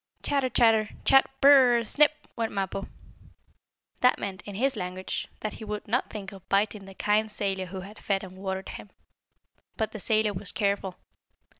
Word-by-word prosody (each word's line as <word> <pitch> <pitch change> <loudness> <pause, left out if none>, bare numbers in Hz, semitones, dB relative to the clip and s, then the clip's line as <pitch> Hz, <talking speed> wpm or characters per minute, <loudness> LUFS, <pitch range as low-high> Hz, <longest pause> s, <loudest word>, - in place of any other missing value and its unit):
"Chatter! 275 -3 +1
Chatter! 225 -3 +4 0.2
Chat! 270 0 +6
Bur 280 - +8 0.2
r - - +4
r - - +4
r! 235 - 0
Snip!" 300 +6 +2
went 230 -1 -2
Mappo. 195 0 -3 1.1
That 250 - +4
meant, 190 -2 -5
in 205 - -7
his 265 +5 +1
language, 185 -1 -4
that 215 - -3
he - - -9
would 210 -1 -5
not 245 +5 0
think 200 -2 -7
of 190 -2 -14
biting 200 0 +1
the 195 0 -12
kind 210 +2 +1
sailor 195 -2 -2
who 190 +1 -6
had 200 +3 -11
fed 195 -1 -1
and 185 -1 -10
watered 190 0 -4
him. - - -9 0.9
But 220 - -1
the 215 - -7
sailor 215 0 +1
was 195 +1 -5
careful. 200 -3 -1
210 Hz, 185 wpm, -27 LUFS, 195-225 Hz, 1.1 s, Bur